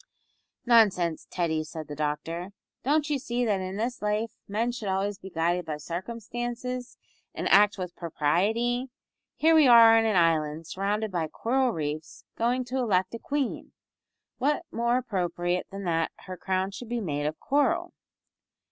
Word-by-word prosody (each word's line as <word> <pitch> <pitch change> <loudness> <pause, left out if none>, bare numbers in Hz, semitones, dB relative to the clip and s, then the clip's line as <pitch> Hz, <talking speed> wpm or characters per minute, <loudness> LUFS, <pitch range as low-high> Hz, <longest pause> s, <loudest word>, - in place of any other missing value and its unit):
"Nonsense, 200 -9 +3
Teddy," 160 -3 -1
said 155 -1 -8
the 145 - -6
doctor, 165 +5 -3 0.3
"don't 295 +3 +1
you 295 -2 0
see 245 -1 -1
that 205 -4 +1
in 185 +1 -4
this 240 +3 -2
life 210 +2 0 0.2
men 225 +4 0
should 235 -4 -6
always 195 +1 -1
be 190 - -9
guided 175 +1 0
by 155 -2 -4
circumstances, 240 - -5 0.4
and - - -2
act 205 +1 +6
with 180 -2 -5
propriety. 220 - 0 0.5
Here 325 +1 +4
we 310 -4 +6
are 230 -2 +9
on 225 - +1
an 220 -2 +2
island 160 -2 +2
surrounded 200 +5 -2
by 170 -3 -1
coral 255 - 0
reefs, 155 -5 -5
going 245 +2 0
to 255 +2 -2
elect 190 -6 +1
a 230 - -5
queen; 280 -1 -3 0.7
what 295 +6 +1
more 235 +1 +1
appropriate 180 -6 -1
than 195 0 -7
that 165 -2 0
her 185 - -6
crown 190 +1 -1
should 225 +4 -9
be 240 0 -1
made 145 -7 -2
of 155 - -4
coral." 335 +6 +1
205 Hz, 160 wpm, -27 LUFS, 170-240 Hz, 0.7 s, are